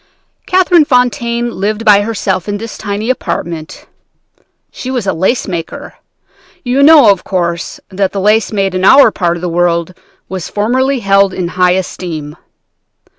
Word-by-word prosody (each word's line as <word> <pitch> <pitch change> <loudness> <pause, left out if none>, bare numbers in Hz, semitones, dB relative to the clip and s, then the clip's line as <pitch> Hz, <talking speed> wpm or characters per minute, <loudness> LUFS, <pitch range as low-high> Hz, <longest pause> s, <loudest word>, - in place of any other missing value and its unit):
"Catherine 365 -3 +4
Fontaine 240 -2 0
lived 215 +2 -3
by 205 -1 +6
herself 205 -3 -2
in 205 - -2
this 225 +1 -8
tiny 210 +3 -3
apartment. 165 -10 -5 0.9
She 255 - -7
was 250 -5 -2
a 195 - 0
lace 190 +9 -1
maker. 170 -4 -6 0.7
You 255 +2 0
know, 285 -7 +7
of 195 - -2
course, 170 -3 -3
that 195 0 -1
the 200 - -4
lace 210 +3 +2
made 195 -3 -1
in 185 0 -2
our 265 +3 +6
part 175 -3 -1
of - - -10
the 180 - -3
world 170 0 0 0.3
was 185 -2 -6
formerly 255 +5 0
held 195 -1 +2
in 175 -2 -3
high 180 0 +2
esteem. 165 -5 -5
200 Hz, 155 wpm, -13 LUFS, 180-235 Hz, 0.9 s, know